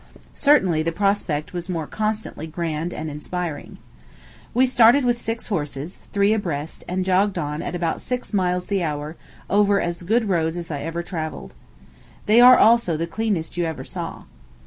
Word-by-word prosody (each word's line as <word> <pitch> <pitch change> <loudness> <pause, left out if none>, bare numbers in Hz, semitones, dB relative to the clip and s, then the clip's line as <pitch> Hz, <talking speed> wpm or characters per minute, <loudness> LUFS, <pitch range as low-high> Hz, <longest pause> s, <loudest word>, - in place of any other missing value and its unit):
Certainly 190 - +3
the 165 +1 -1
prospect 190 -5 0
was 175 0 -5
more 165 -4 -2
constantly 215 -5 -3
grand 165 0 -3
and 160 - -5
awe - - -4
inspiring. 160 0 -5 0.7
We 255 +2 +4
started 250 +1 +5
with 240 -1 +1
six 225 0 -4
horses, 150 -3 -4
three 200 +1 +3
abreast, 165 -8 -3
and 185 +1 -2
jogged 190 +1 +2
on, 150 -2 -3
at - - -4
about 170 -2 -2
six 250 -2 -4
miles 180 -2 +1
the 200 -2 -1
hour, 150 -1 -3 0.3
over 205 0 +3
as 170 0 -3
good 220 +5 +1
roads 165 -3 0
as 170 -1 -6
I 145 - -3
ever 165 +3 -4
travelled. 155 - -6 0.7
They 220 +3 +6
are, 250 +1 +9
also, 225 -8 +4
the 165 - -1
cleanest 175 -2 -2
you 175 - +1
ever 160 -1 -4
saw. - - -6
180 Hz, 170 wpm, -22 LUFS, 160-210 Hz, 0.7 s, are